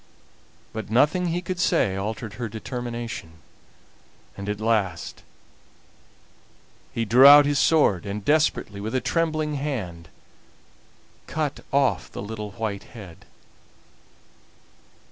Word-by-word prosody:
But 110 Hz, -2 st, -6 dB
nothing 150 Hz, +10 st, +3 dB
he 175 Hz, +2 st, -2 dB
could 180 Hz, 0 st, -4 dB
say 95 Hz, -, +2 dB
altered 105 Hz, +2 st, -4 dB
her 115 Hz, +1 st, -5 dB
determination, 115 Hz, -5 st, -6 dB, 1.0 s
and 100 Hz, +1 st, -6 dB
at 105 Hz, 0 st, -3 dB
last 105 Hz, -7 st, -1 dB, 1.7 s
he 115 Hz, -, -2 dB
drew 135 Hz, +6 st, +9 dB
his 145 Hz, -1 st, +1 dB
sword, 125 Hz, -, +3 dB
and 100 Hz, +1 st, -5 dB
desperately, 145 Hz, -9 st, +1 dB
with 110 Hz, +5 st, -4 dB
a -, -, +3 dB
trembling 155 Hz, +3 st, -1 dB
hand, 95 Hz, -, -5 dB, 1.2 s
cut 150 Hz, -2 st, -2 dB
off 135 Hz, -9 st, +1 dB
the -, -, -6 dB
little 105 Hz, -1 st, -6 dB
white 110 Hz, -4 st, -4 dB
head. 95 Hz, -6 st, -12 dB
115 Hz, 105 wpm, -24 LUFS, 100-145 Hz, 1.7 s, drew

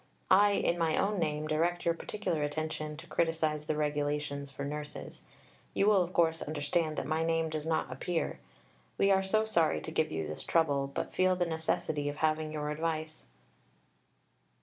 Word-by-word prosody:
I, 205 Hz, +2 st, +7 dB
in 175 Hz, -3 st, +1 dB
my 160 Hz, -1 st, +2 dB
own 200 Hz, 0 st, +1 dB
name, 155 Hz, -2 st, -1 dB
direct 165 Hz, +3 st, 0 dB
your 170 Hz, -, +3 dB
particular 170 Hz, -2 st, -3 dB
attention 155 Hz, 0 st, -3 dB
to 165 Hz, -, -10 dB
criticize 155 Hz, -2 st, 0 dB
the 155 Hz, -, 0 dB
Regulations 145 Hz, -1 st, -1 dB
for 140 Hz, 0 st, -6 dB
Nurses. 150 Hz, +1 st, -6 dB, 0.5 s
You 195 Hz, -, +3 dB
will 205 Hz, -2 st, +5 dB
of 175 Hz, 0 st, -2 dB
course 165 Hz, -2 st, +2 dB
understand 155 Hz, +1 st, -1 dB
that -, -, -2 dB
my 160 Hz, +1 st, 0 dB
name 165 Hz, -1 st, +1 dB
does 155 Hz, 0 st, -3 dB
not 160 Hz, -5 st, 0 dB
appear. 165 Hz, +6 st, -2 dB, 0.6 s
We 195 Hz, -, +4 dB
are 190 Hz, 0 st, +5 dB
so 215 Hz, +3 st, +1 dB
sorry 165 Hz, -, +2 dB
to -, -, -6 dB
give -, -, +1 dB
you 80 Hz, 0 st, -2 dB
this 75 Hz, -, -6 dB
trouble, 140 Hz, -4 st, +2 dB
but -, -, -4 dB
feel 185 Hz, 0 st, +3 dB
the 180 Hz, -1 st, +1 dB
necessity 160 Hz, -2 st, -1 dB
of 145 Hz, -, -5 dB
having 155 Hz, 0 st, 0 dB
your 150 Hz, -1 st, -3 dB
advice. 155 Hz, 0 st, -3 dB
155 Hz, 175 wpm, -31 LUFS, 150-170 Hz, 0.6 s, I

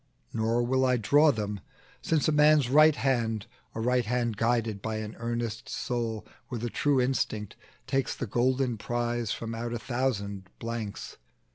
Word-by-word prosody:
Now 115 Hz, +2 st, +1 dB
will 130 Hz, +2 st, +1 dB
I 125 Hz, -1 st, +3 dB
draw 145 Hz, +7 st, +5 dB
them, 105 Hz, -4 st, -3 dB, 0.4 s
since 160 Hz, -3 st, +1 dB
a -, -, +3 dB
man's 150 Hz, -3 st, +5 dB
right 155 Hz, +1 st, +7 dB
hand, 115 Hz, -5 st, 0 dB, 0.3 s
A -, -, -3 dB
right 125 Hz, +2 st, +2 dB
hand 120 Hz, -1 st, 0 dB
guided 115 Hz, -2 st, 0 dB
by 110 Hz, +1 st, -3 dB
an 110 Hz, 0 st, -5 dB
earnest 115 Hz, -1 st, -3 dB
soul, 115 Hz, -3 st, -3 dB, 0.2 s
With 120 Hz, -2 st, -4 dB
a 120 Hz, -, -2 dB
true 145 Hz, -2 st, +2 dB
instinct, 125 Hz, -5 st, -1 dB, 0.3 s
takes 135 Hz, -1 st, 0 dB
the -, -, -3 dB
golden 125 Hz, +1 st, +1 dB
prize 120 Hz, -1 st, -1 dB
From 115 Hz, 0 st, -4 dB
out 115 Hz, +1 st, -4 dB
a -, -, -1 dB
thousand 115 Hz, -6 st, -2 dB
blanks. 115 Hz, -3 st, -5 dB
120 Hz, 160 wpm, -28 LUFS, 110-130 Hz, 0.4 s, right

